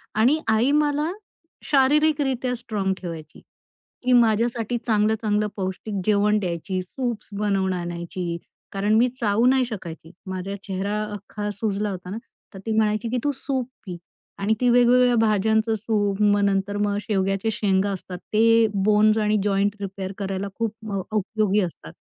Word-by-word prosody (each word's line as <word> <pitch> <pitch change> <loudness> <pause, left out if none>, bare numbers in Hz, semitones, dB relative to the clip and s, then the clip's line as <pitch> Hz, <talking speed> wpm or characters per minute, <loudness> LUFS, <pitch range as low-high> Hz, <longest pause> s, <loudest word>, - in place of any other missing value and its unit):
आणि 245 +9 +3
आई 225 +5 +3
मला 295 +2 +1 0.5
शारीरिकरीत्या 275 -3 +2
स्ट्राँग 210 -5 -2
ठेवायची, 165 -4 -8 0.6
की 250 0 +3
माझ्यासाठी 235 0 +2
चांगलं-चांगलं 215 -1 +1
पौष्टिक 190 +2 -4
जेवण 210 0 +3
द्यायची, 185 0 -3
सूप्स 235 +3 -4
बनवून 195 -3 +1
आणायची. 175 0 -4 0.3
कारण 200 +2 0
मी 245 - +5
चावू 220 +1 +2
नाही 260 0 +4
शकायची 170 -7 -8 0.2
माझा 190 +1 -4
चेहरा 200 +2 -2
अख्खा 205 +1 -5
सुजला 205 0 -2
होता 180 -1 -7
ना 205 - -4 0.4
तर 195 - -9
ती 225 - -2
म्हणायची, 215 +1 +1
की 250 - -1
तू 290 - +2
सूप 265 -2 -3 0.2
पी 180 -2 -6 0.4
आणि 200 +2 +1
ती 250 - +3
वेगवेगळ्या 245 0 +5
भाज्यांचं 220 0 +2
सूप, 205 -2 -1
मग 205 0 +4
नंतर 200 +1 0
मग 205 0 0
शेवग्याच्या 195 0 0
शेंगा 200 -1 +1
असतात 185 -1 -6 0.2
ते 225 +1 +5
बोन्स 210 +2 +3
आणि 215 0 +2
जॉइंट 200 0 +1
रिपेअर 195 -1 -5
करायला 195 0 -3
खूप 225 -2 -2 0.2
अ, 195 - -1 0.2
उपयोगी 210 0 +1
असतात. 175 -3 -6
210 Hz, 145 wpm, -23 LUFS, 195-230 Hz, 0.6 s, मी